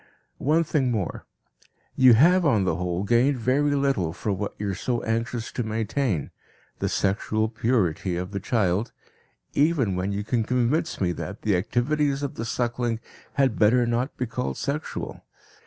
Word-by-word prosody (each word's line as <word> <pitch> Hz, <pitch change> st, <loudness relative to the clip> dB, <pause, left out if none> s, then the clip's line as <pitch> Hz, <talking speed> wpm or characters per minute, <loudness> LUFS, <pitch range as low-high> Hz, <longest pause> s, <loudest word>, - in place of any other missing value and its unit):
One 155 Hz, +4 st, +3 dB
thing 145 Hz, -5 st, 0 dB
more. 105 Hz, -8 st, -3 dB, 0.7 s
You 130 Hz, -2 st, +7 dB
have 175 Hz, +9 st, +5 dB
on 115 Hz, -, +3 dB
the 90 Hz, -4 st, 0 dB
whole 90 Hz, +1 st, -2 dB
gained 120 Hz, +6 st, +3 dB
very 140 Hz, +5 st, +2 dB
little 135 Hz, -, +1 dB
for 105 Hz, +3 st, -3 dB
what 100 Hz, +2 st, -4 dB
you 100 Hz, -1 st, -2 dB
are -, -, -3 dB
so 120 Hz, +5 st, -2 dB
anxious 115 Hz, +1 st, -2 dB
to -, -, -3 dB
maintain, 110 Hz, -, -1 dB, 0.5 s
the -, -, 0 dB
sexual 105 Hz, +2 st, 0 dB
purity 110 Hz, -6 st, 0 dB
of 90 Hz, +2 st, -4 dB
the 100 Hz, -, -3 dB
child, 100 Hz, 0 st, 0 dB, 0.6 s
even 145 Hz, -, +2 dB
when 95 Hz, +2 st, -1 dB
you 100 Hz, +1 st, -2 dB
can 115 Hz, +2 st, 0 dB
convince 125 Hz, +7 st, 0 dB
me 90 Hz, -3 st, +1 dB
that 85 Hz, -, -6 dB
the 105 Hz, -3 st, +2 dB
activities 140 Hz, +8 st, 0 dB
of 140 Hz, -, -2 dB
the 115 Hz, -, -5 dB
suckling 120 Hz, -1 st, -1 dB, 0.3 s
had 135 Hz, -5 st, +1 dB
better 120 Hz, +3 st, +4 dB
not 120 Hz, +3 st, -1 dB
be 125 Hz, -, -1 dB
called 70 Hz, -, -3 dB
sexual. 145 Hz, +3 st, -4 dB
115 Hz, 165 wpm, -25 LUFS, 100-135 Hz, 0.7 s, You